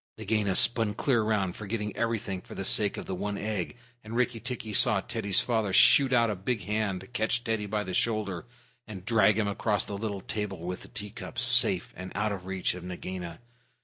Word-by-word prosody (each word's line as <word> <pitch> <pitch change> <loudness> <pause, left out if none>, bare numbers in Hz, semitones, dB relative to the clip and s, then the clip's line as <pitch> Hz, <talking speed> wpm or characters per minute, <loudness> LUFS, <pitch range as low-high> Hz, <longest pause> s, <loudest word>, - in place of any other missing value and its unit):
Nagaina 105 -4 0
spun 115 -1 +3
clear 130 -5 +2
round, 105 -4 0
forgetting 105 -1 -4
everything 110 -5 -2
for - - -12
the 95 - -4
sake 105 +1 +3
of - - -6
the - - -4
one 100 +2 -3
egg. 105 0 -3 0.3
Rikki 115 +2 -1
tikki 115 -3 -5
saw 120 -3 +5
Teddy's 100 -1 +1
father 110 -5 0
shoot 135 +7 +6
out 115 -3 +3
a - - -2
big 100 +3 -2
hand, 100 0 -3
catch 120 0 0
Teddy 110 -3 -2
by 105 +1 -1
the 95 - -6
shoulder, 105 -1 -1 0.4
and 95 -4 -9
drag 105 -2 +4
him 105 -2 +1
across 100 0 0
the - - -8
little 100 -1 -4
table 105 -1 -4
with 90 0 -4
the - - -12
tea 105 -1 -7
cups, 120 +2 -4
safe 120 -7 +5
and 95 0 -8
out 105 +1 0
of 95 -2 -6
reach 95 -1 -1
of 90 -1 -9
Nagaina. 90 -1 -7
105 Hz, 200 wpm, -28 LUFS, 95-115 Hz, 0.4 s, shoot